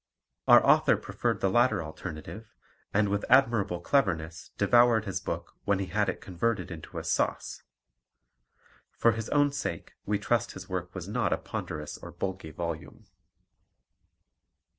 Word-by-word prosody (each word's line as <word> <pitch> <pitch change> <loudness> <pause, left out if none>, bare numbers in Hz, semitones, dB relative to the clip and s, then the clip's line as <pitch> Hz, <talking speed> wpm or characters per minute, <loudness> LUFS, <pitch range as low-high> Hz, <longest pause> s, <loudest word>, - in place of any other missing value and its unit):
Our - - +8
author - - +5
preferred - - -2
the 95 - +2
latter 120 -5 +3
alternative, 90 +7 -8 0.4
and 105 +1 +2
with 100 +1 -1
admirable 115 -9 +3
cleverness 85 - 0
devoured 115 +1 +4
his 95 - -3
book - - -5
when 100 -1 +2
he 95 - -2
had 105 +3 0
converted 100 +4 -2
it - - -3
into 80 - -10
a - - -3
sauce. - - -1 1.4
For 115 - +4
his 115 0 -4
own 145 -1 +3
sake 140 -12 -4
we 105 0 +1
trust 120 +3 0
his 95 0 -9
work 90 -1 -4
was 90 -1 -6
not 120 +4 0
a - - 0
ponderous 75 -1 -6
or - - -9
bulky 95 -3 -4
volume. 85 0 -6
100 Hz, 145 wpm, -29 LUFS, 85-115 Hz, 1.4 s, Our